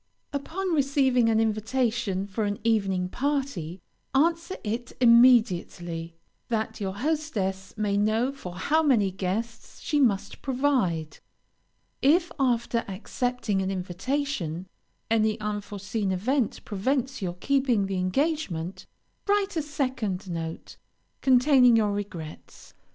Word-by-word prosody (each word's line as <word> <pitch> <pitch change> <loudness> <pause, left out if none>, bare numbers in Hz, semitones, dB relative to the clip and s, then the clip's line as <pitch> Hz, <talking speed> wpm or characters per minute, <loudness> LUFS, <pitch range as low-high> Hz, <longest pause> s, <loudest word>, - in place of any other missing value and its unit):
Upon 345 +6 -2
receiving 270 -5 +3
an 220 -1 +3
invitation 220 -2 0
for 205 +2 -2
an 205 0 -1
evening 195 -5 +1
party, 260 - -2 0.4
answer 335 +5 +2
it 230 +3 -3
immediately, 205 -9 +4 0.3
that 220 -2 -2
your 190 -1 -2
hostess 205 -9 -2
may 205 -1 0
know 220 +5 +2
for 185 -11 -9
how 300 - +2
many 235 -11 +3
guests 205 +6 -4
she 295 - 0
must 205 -7 +1
provide. 250 - 0 0.8
If, 330 +6 +3
after 235 -3 +1
accepting 215 +1 -2
an 190 - -1
invitation, 185 - -2 0.5
any 220 0 +2
unforeseen 205 -1 -3
event 230 +6 -1
prevents 260 +5 -1
your 175 -2 -3
keeping 255 -1 +1
the 195 -1 -2
engagement, 185 - -1 0.4
write 405 -1 +1
a 320 - +1
second 255 -10 -2
note, 165 -2 -6 0.4
containing 255 -2 +5
your 210 -2 +2
regrets. 190 -6 -7
225 Hz, 110 wpm, -26 LUFS, 190-270 Hz, 0.8 s, containing